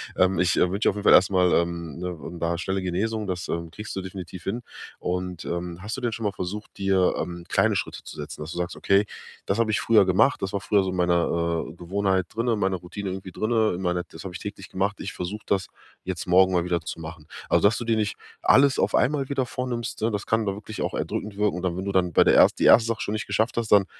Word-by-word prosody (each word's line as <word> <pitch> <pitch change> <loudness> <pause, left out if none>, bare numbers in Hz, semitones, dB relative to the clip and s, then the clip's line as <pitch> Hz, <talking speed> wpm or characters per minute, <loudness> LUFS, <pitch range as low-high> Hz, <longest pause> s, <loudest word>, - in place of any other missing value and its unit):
Ähm, 95 -1 +3
ich, 90 +1 +3
äh, 90 - +3
wünsche 100 +3 +2
auf - - -2
jeden 105 - -5
Fall - - +6
erst 95 - +7
mal, 90 -2 +3
ähm, 85 -3 -1
ne, 90 -1 -4 0.2
da 85 +1 0
schnelle 95 +2 -2
Genesung. 105 +4 -2
Das, 90 -2 -4
ähm, 85 0 -3
kriegst 105 +6 -8
du 95 - -2
definitiv 90 -1 -8
hin. 115 +5 -2 0.4
Und, 90 -1 -3
ähm, 85 0 -4
hast 105 +2 -4
du - - -6
denn 120 -2 -1
schon 115 - -5
mal 105 - +1
versucht, 100 +3 -6
dir, 95 -2 +2
ähm, 85 -1 -4
kleine - - +3
Schritte - - -3
zu - - -10
setzen? - - -7
Dass 75 +2 -6
du - - -7
sagst: 90 +1 -3
„Okay, 100 +1 +3 0.4
das 100 - 0
habe 115 -2 +2
ich 105 - +1
früher 110 -4 +5
gemacht, 95 +9 +3
das 95 - -3
war 100 - -1
früher 105 -1 +2
so 95 - -2
meine, 90 -1 +2 0.5
äh, - - -9
Gewohnheit 95 +1 0
drinne, 115 +1 +1
meine 95 -2 0
Routine 95 +3 -6
irgendwie 95 0 -6
drinne, 110 0 +1
in 90 - -5
meine 90 -1 0
das 80 - -10
habe 95 -2 -7
ich 95 - -6
täglich 100 -2 -7
gemacht. 100 +2 -1
Ich 100 - -4
versuche 100 +5 -5
das 95 -3 0 0.4
jetzt 90 -1 -4
morgen 95 +1 +5
mal 90 -1 +2
wieder 90 -1 0
zu 80 +1 -7
machen.“ 80 -1 -9 0.2
Also, - - +3
dass 110 - +1
du - - -4
dir 115 -1 +2
nicht 105 -2 -1 0.3
alles 140 0 +5
auf - - +2
einmal 140 0 +2
wieder 135 -2 0
vornimmst, 120 -2 -4
ne? 110 +1 +1
Das 105 0 -3
kann 110 0 +1
da 100 - 0
wirklich 110 +2 -7
auch - - -2
erdrückend 105 0 -3
wirken. 105 -3 +1
Und 90 - -5
dann 90 -2 -1
wenn 95 - -4
du 100 - -1
dann 90 -3 +1
bei - - +6
der - - +4
erst - - +5
die - - +2
1. 115 -1 +7
Sache 115 -2 -2
schon 105 - -2
nicht 110 - -3
geschafft 110 +4 0
hast, 115 -2 -1
dann 100 -2 +6
95 Hz, 265 wpm, -25 LUFS, 90-105 Hz, 0.5 s, erst